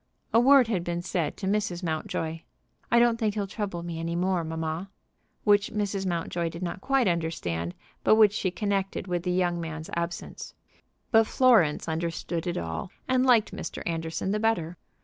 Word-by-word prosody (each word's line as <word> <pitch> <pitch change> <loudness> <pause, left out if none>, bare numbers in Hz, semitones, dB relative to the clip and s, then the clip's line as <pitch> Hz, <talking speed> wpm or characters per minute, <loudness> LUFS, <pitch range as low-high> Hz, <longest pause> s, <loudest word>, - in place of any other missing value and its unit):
A 230 - +6
word 265 0 +6
had 195 -7 -1
been 175 0 -3
said 170 -4 -2
to 195 - -5
Mrs. 195 -3 -1
Mountjoy, 160 0 -2 0.5
"I 235 - +5
don't 235 -1 +4
think 215 -2 0
he'll 205 -2 -1
trouble 195 -4 -4
me 170 -1 -5
any 165 +1 -2
more, 180 0 +1
mamma," 160 +3 -3 0.5
which 205 -1 +3
Mrs. 200 -2 -2
Mountjoy 170 -1 -1
did 170 +2 -7
not 180 +2 -4
quite 270 -2 +2
understand, 125 - -2 0.3
but - - +6
which 215 -2 +6
she 195 - 0
connected 195 0 -2
with 175 -2 -1
the 180 +1 -1
young 175 -1 +1
man's 160 -1 -6
absence. 170 0 -5 0.6
But 225 -2 +5
Florence 225 - +4
understood 165 +1 -3
it 175 - -1
all, 80 - -4 0.2
and 255 0 +3
liked 235 -4 +4
Mr. - - -6
Anderson 165 +2 -2
the 210 - 0
better. 180 -7 0
180 Hz, 175 wpm, -27 LUFS, 165-210 Hz, 0.6 s, A